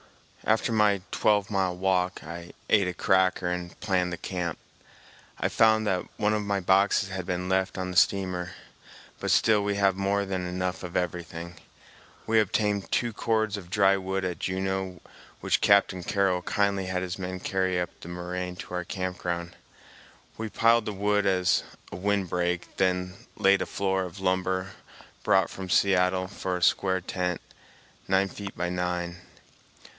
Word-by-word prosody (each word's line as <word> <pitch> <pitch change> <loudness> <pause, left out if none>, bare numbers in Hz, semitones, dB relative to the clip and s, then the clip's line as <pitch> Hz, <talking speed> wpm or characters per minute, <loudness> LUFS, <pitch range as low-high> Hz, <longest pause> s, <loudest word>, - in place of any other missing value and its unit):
After 110 +2 +2
my 105 -3 +3
twelve 105 -1 +2
mile 95 -3 0
walk, 90 -3 0
I 85 +2 -8
ate 100 -4 +4
a 90 - -2
cracker 95 -3 +2
and 90 -1 -5
planned 90 -2 0
the 85 - -4
camp. 90 -3 -3 0.8
I - - +1
found 110 -1 +4
that 95 -3 0
one 105 +1 +2
of 105 - 0
my 100 -1 -1
boxes 95 +2 +3
had 95 -2 -5
been 90 0 -2
left 95 +1 0
on 95 0 -3
the - - -7
steamer, 90 -2 +2 0.7
but - - -3
still 105 -2 +4
we 100 0 0
have 100 -1 +3
more 100 +1 0
than 95 -2 -3
enough 90 0 -2
of 90 -1 -4
everything. 85 0 -4 0.7
We 110 0 +3
obtained 105 -1 0
two 120 -2 +1
cords 110 -1 0
of 90 -4 -10
dry 100 -1 +4
wood 95 0 -2
at 90 -2 -3
Juneau 95 -1 -2 0.4
which - - +1
Captain 100 -2 +4
Carroll 95 0 +1
kindly 100 0 0
had 90 0 -1
his 90 0 -4
men 95 0 -4
carry 95 -1 0
up 90 -1 -2
the - - -11
moraine 90 +1 -4
to 90 - -8
our 90 0 -1
camp 90 0 -4
ground. 85 0 -3 0.8
We 110 0 -4
piled 115 +1 +3
the 105 - -3
wood 105 +1 +1
as 90 -1 +3 0.3
a - - -6
wind 100 +1 0
break, 90 0 -2
then 90 0 -1
laid 95 0 +4
a - - -2
floor 95 -1 0
of 90 +2 -9
lumber 95 0 0 0.5
brought - - +3
from 95 -1 -7
Seattle 95 -1 +3
for 95 -1 -3
a 90 - -4
square 95 0 +2
tent, 90 -1 -2 0.7
nine 95 0 +3
feet 100 0 -8
by 90 0 -1
nine. 90 -1 -2
95 Hz, 170 wpm, -27 LUFS, 90-100 Hz, 0.8 s, ate